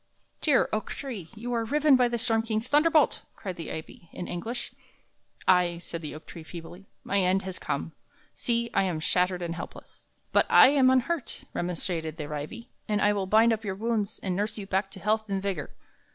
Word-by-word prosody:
"Dear 290 -5 +4
oak 215 - -1
tree, 225 - -6
you 240 +3 -4
are 230 -1 +1
riven 295 +4 +4
by 250 -1 +4
the 240 0 -1
storm 225 -1 +2
king's 225 +1 -2
thunderbolt!" 300 +1 +4
cried 185 -3 -5
the 165 -2 -6
ivy, 160 +1 -8
in 180 - -6
anguish. 235 +7 -4 0.8
"Ay," 180 -2 +4
said 170 -1 -6
the 155 -2 -6
oak 155 - -11
tree, 170 - -9
feebly, 170 +3 -10 0.2
"my 200 - +1
end 190 +1 +2
has 190 -1 -5
come; - - -3 0.4
see, 235 -1 0
I - - +4
am 180 -5 -1
shattered 180 +2 +1
and 170 -1 -2
helpless." 170 - -9 0.3
"But - - +4
I - - +9
am 275 -2 +5
unhurt," 260 +3 0
remonstrated 165 -2 -3
the 150 - -4
ivy, 230 - -6 0.2
"and 210 -2 +1
I 205 0 +4
will 195 -2 -1
bind 225 +3 +5
up 220 0 -3
your 195 -3 -3
wounds 220 0 -1
and 185 -2 -1
nurse 205 +3 -1
you 205 - -5
back 195 0 0
to 195 - -11
health 215 +2 0
and 195 -1 0
vigor." 190 -6 -3
200 Hz, 200 wpm, -28 LUFS, 180-235 Hz, 0.8 s, I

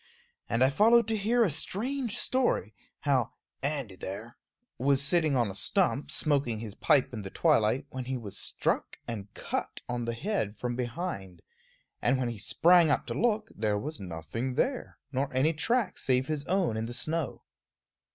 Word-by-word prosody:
And 115 +2 +3
I 130 - +4
followed 225 +8 +5
to 225 - +2
hear 230 +4 +3
a 195 - +3
strange 235 - 0
story, 245 - +1 0.3
how 135 -5 +1 0.3
"Andy 140 -8 -2
there" 105 +6 -7 0.4
was 140 +1 +3
sitting 155 0 +2
on 120 -5 +2
a - - -8
stump, 150 - +1
smoking 140 -7 +1
his 105 -2 -6
pipe 130 +4 +3
in 110 - -4
the 95 - -6
twilight, 130 - +2
when 130 -1 -5
he 130 +1 -2
was 105 -5 -7
struck - - -1
and 105 -4 -5
cut - - -4
on 120 -1 -2
the 115 0 -2
head 115 - -2
from 120 +1 -2
behind; 120 - -4 0.6
and 130 - +3
when 125 -2 -1
he 115 -3 -6
sprang 170 - +5
up - - +2
to - - -4
look, 220 -2 +1
there 105 -1 0
was 150 +8 -5
nothing 95 +9 -4
there, 260 - -1
nor 135 +1 -1
any 150 +5 +4
track 230 +9 0
save 130 -1 +2
his 150 0 -3
own 180 - +1
in 110 +1 -2
the 120 - -6
snow. 160 -1 -3
135 Hz, 175 wpm, -29 LUFS, 115-175 Hz, 0.6 s, followed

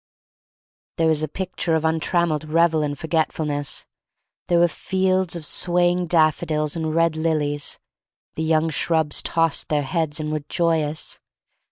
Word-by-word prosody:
There 165 - +2
was 155 -1 +2
a 155 - -1
picture 180 0 -2
of 160 0 0
untrammeled 160 -1 +1
revel 160 0 +2
and 145 -1 -2
forgetfulness. 155 -2 -2 0.6
There 175 - +3
were 175 0 +5
fields 185 +1 0
of 165 -3 -6
swaying 175 +2 +2
daffodils 155 -1 +1
and 160 -1 -2
red 165 -1 +2
lilies. 150 -2 0 0.6
The - - -5
young 160 0 +1
shrubs 160 0 +1
tossed 165 -2 0
their 150 -1 +1
heads 160 +1 -1
and 155 0 -3
were 155 -1 -2
joyous. 160 -3 -1
160 Hz, 140 wpm, -22 LUFS, 155-170 Hz, 0.6 s, were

